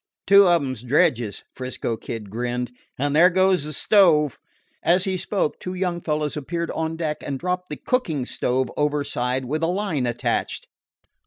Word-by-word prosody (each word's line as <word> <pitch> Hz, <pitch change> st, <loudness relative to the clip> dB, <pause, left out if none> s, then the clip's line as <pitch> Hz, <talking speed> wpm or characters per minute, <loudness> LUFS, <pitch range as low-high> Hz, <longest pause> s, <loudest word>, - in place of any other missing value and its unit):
"Two 200 Hz, -1 st, +7 dB
of 170 Hz, -3 st, +4 dB
'em 130 Hz, -1 st, -2 dB
's 115 Hz, -, -10 dB
dredges," 125 Hz, -, +1 dB
'Frisco 125 Hz, -2 st, -4 dB
Kid 110 Hz, -2 st, -7 dB
grinned; 125 Hz, +2 st, -3 dB, 0.3 s
"and 145 Hz, +2 st, 0 dB
there 175 Hz, +4 st, +7 dB
goes 185 Hz, -3 st, +2 dB
the 155 Hz, -, -4 dB
stove." 155 Hz, -, +4 dB, 0.4 s
As 175 Hz, +2 st, +3 dB
he 190 Hz, -1 st, -1 dB
spoke, 185 Hz, -3 st, -1 dB
two 180 Hz, 0 st, -5 dB
young 180 Hz, -2 st, -2 dB
fellows 150 Hz, -2 st, -1 dB
appeared 170 Hz, +3 st, -3 dB
on 160 Hz, 0 st, -2 dB
deck 155 Hz, -2 st, -2 dB
and 140 Hz, -2 st, -4 dB
dropped 180 Hz, +4 st, -3 dB
the 150 Hz, -, -5 dB
cooking 160 Hz, -, -1 dB
stove 125 Hz, 0 st, -1 dB
overside 140 Hz, -3 st, -1 dB
with 155 Hz, +5 st, -2 dB
a 165 Hz, -, +2 dB
line 175 Hz, -8 st, -1 dB
attached. 120 Hz, -, -2 dB
150 Hz, 170 wpm, -23 LUFS, 130-180 Hz, 0.4 s, Two